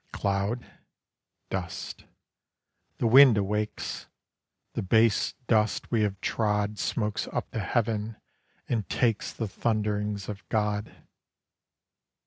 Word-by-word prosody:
Cloud?—dust. 100 Hz, -3 st, -5 dB, 0.9 s
The -, -, -1 dB
wind 125 Hz, 0 st, +8 dB
awakes; 105 Hz, +2 st, -2 dB, 0.7 s
The -, -, -2 dB
base 110 Hz, +2 st, +3 dB
dust 110 Hz, -2 st, +1 dB
we 115 Hz, -2 st, +2 dB
have 100 Hz, -2 st, 0 dB
trod 105 Hz, -1 st, 0 dB
Smokes 105 Hz, -2 st, -1 dB
up -, -, -3 dB
to 115 Hz, -, -3 dB
heaven 110 Hz, +1 st, -1 dB, 0.5 s
and 110 Hz, -4 st, -1 dB
takes 115 Hz, -3 st, +1 dB
The 115 Hz, -, -3 dB
thunderings 105 Hz, -1 st, -1 dB
of 100 Hz, -2 st, -6 dB
God. 105 Hz, -1 st, 0 dB
105 Hz, 100 wpm, -28 LUFS, 105-115 Hz, 0.9 s, wind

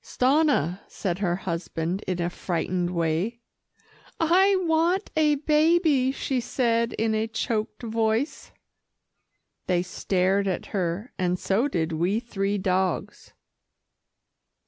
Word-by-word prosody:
"Stanna," 255 Hz, -, +2 dB
said 185 Hz, -2 st, -3 dB
her 175 Hz, -4 st, +1 dB
husband 170 Hz, 0 st, -3 dB
in 185 Hz, -1 st, -1 dB
a 175 Hz, 0 st, -1 dB
frightened 175 Hz, 0 st, -2 dB
way. 170 Hz, +6 st, -1 dB, 0.8 s
"I 375 Hz, +5 st, +4 dB
want 335 Hz, +4 st, +1 dB
a 305 Hz, -1 st, +4 dB
baby," 300 Hz, -2 st, +3 dB
she 265 Hz, -1 st, -2 dB
said 235 Hz, -1 st, 0 dB
in 220 Hz, 0 st, 0 dB
a 220 Hz, +1 st, 0 dB
choked 225 Hz, 0 st, -3 dB
voice. 225 Hz, +4 st, -1 dB, 1.2 s
They 180 Hz, -1 st, +2 dB
stared 190 Hz, +2 st, 0 dB
at 185 Hz, -, -2 dB
her, 190 Hz, +5 st, -2 dB
and 180 Hz, -1 st, +1 dB
so 205 Hz, +9 st, +1 dB
did 165 Hz, -, -1 dB
we 175 Hz, +7 st, 0 dB
three 205 Hz, -4 st, -2 dB
dogs. 185 Hz, -2 st, -1 dB
215 Hz, 115 wpm, -25 LUFS, 180-265 Hz, 1.2 s, I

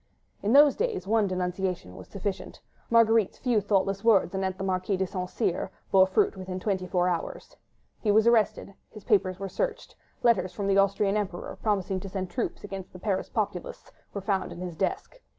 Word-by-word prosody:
In 205 Hz, -, 0 dB
those 285 Hz, 0 st, +7 dB
days 460 Hz, -2 st, -2 dB
one 215 Hz, 0 st, +2 dB
denunciation 180 Hz, -, -3 dB
was -, -, -11 dB
sufficient: 200 Hz, 0 st, -5 dB, 0.3 s
Marguerite's 225 Hz, -3 st, +4 dB
few 240 Hz, -5 st, +1 dB
thoughtless 195 Hz, 0 st, 0 dB
words 210 Hz, -5 st, +4 dB
anent 190 Hz, -1 st, -2 dB
the 190 Hz, -, -4 dB
Marquis 190 Hz, +1 st, 0 dB
de 190 Hz, -, 0 dB
St. 180 Hz, 0 st, -4 dB
Cyr 180 Hz, +1 st, -1 dB, 0.2 s
bore 190 Hz, -1 st, +6 dB
fruit 190 Hz, -, +2 dB
within 185 Hz, -1 st, -5 dB
twenty 185 Hz, -2 st, -2 dB
four 180 Hz, -1 st, +1 dB
hours. 175 Hz, -2 st, -4 dB, 0.4 s
He 215 Hz, -, -1 dB
was 215 Hz, +2 st, +5 dB
arrested. 220 Hz, -3 st, +2 dB, 0.2 s
His 215 Hz, -2 st, -12 dB
papers 190 Hz, -5 st, +2 dB
were 195 Hz, 0 st, -4 dB
searched: 190 Hz, -, -3 dB, 0.3 s
letters 215 Hz, -6 st, +3 dB
from 200 Hz, -, -4 dB
the 195 Hz, 0 st, +3 dB
Austrian 200 Hz, +1 st, +2 dB
Emperor, 190 Hz, -4 st, -4 dB
promising 195 Hz, -3 st, 0 dB
to 195 Hz, -, -7 dB
send 185 Hz, -1 st, -4 dB
troops 245 Hz, -, -3 dB
against 195 Hz, -2 st, -7 dB
the -, -, -9 dB
Paris 190 Hz, 0 st, -2 dB
populace, 205 Hz, -6 st, -4 dB, 0.2 s
were 200 Hz, -, -5 dB
found 195 Hz, -1 st, -1 dB
in -, -, -8 dB
his 180 Hz, -2 st, -5 dB
desk. 200 Hz, -, -3 dB
195 Hz, 185 wpm, -27 LUFS, 185-210 Hz, 0.4 s, those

